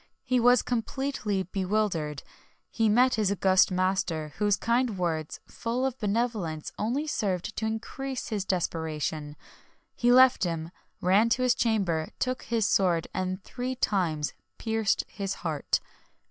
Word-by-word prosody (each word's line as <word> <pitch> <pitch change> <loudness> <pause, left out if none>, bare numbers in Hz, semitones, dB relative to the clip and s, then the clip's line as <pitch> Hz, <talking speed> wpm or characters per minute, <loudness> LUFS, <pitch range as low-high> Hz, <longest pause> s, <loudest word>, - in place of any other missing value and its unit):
He 255 -1 +1
was 245 +1 +5
completely 235 -4 -2
bewildered: 185 -6 -1 0.5
he 225 -2 +2
met 250 +4 +4
his 210 -3 +1
august 190 -1 +4
master, 180 -5 -1
whose 205 -1 +3
kind 235 -1 +1
words, 160 -4 -2
full 245 +3 -2
of 265 -1 -2
benevolence, 210 -7 -1
only 250 +8 0
served 205 - -2
to 220 - -1
increase 255 +4 -4
his 210 -3 -1
desperation; 160 -4 -2 0.6
he 240 0 +3
left 255 -2 +6
him, 165 -2 -2 0.3
ran 200 +6 +4
to 255 +2 +1
his 250 -1 +4
chamber, 190 -10 0
took 255 0 -1
his 230 -3 0
sword, 175 -5 +2
and 185 +1 -3
three 255 +1 -4
times 170 - 0 0.2
pierced 220 -3 0
his 195 -2 -4
heart. 155 -3 0
205 Hz, 135 wpm, -28 LUFS, 175-235 Hz, 0.6 s, left